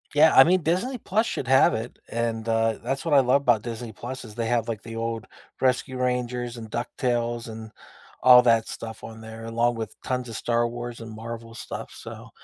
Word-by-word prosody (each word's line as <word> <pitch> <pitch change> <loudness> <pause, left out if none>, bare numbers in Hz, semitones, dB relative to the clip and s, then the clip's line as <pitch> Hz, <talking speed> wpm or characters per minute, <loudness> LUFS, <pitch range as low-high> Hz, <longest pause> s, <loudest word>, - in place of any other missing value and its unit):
Yeah, 155 +2 +6
I 135 - +11
mean, 180 +5 +3
Disney 185 - 0
Plus 220 +1 0
should 125 - -3
have 135 +1 +5
it, 115 +2 -6
and, 115 -1 -2
uh, 115 -1 +1
that's 135 +5 -2
what 165 - +1
I 140 - +8
love 130 +2 +3
about 120 -5 +4
Disney 115 0 -6
Plus 125 +5 -7
is 110 - -11
they 115 0 -2
have, 120 -2 +1
like, 110 -2 -3
the 115 -1 -8
old 115 -1 -3 0.3
Rescue 130 0 +1
Rangers 125 -1 -1
and 115 -1 -7
Duck 120 +3 -3
Tales 120 -2 -1
and 110 -1 -8 0.5
all 125 -1 +9
that 115 -2 +3
stuff 110 -1 -7
on 110 0 -9
there 110 0 -9
along 115 +1 +1
with 110 -4 -5
tons 125 -1 -2
of 115 - -7
Star 120 +1 +1
Wars 120 0 -6
and 115 -1 -8
Marvel 115 +1 -7
stuff, - - -7
so, - - -10
120 Hz, 210 wpm, -25 LUFS, 115-125 Hz, 0.5 s, I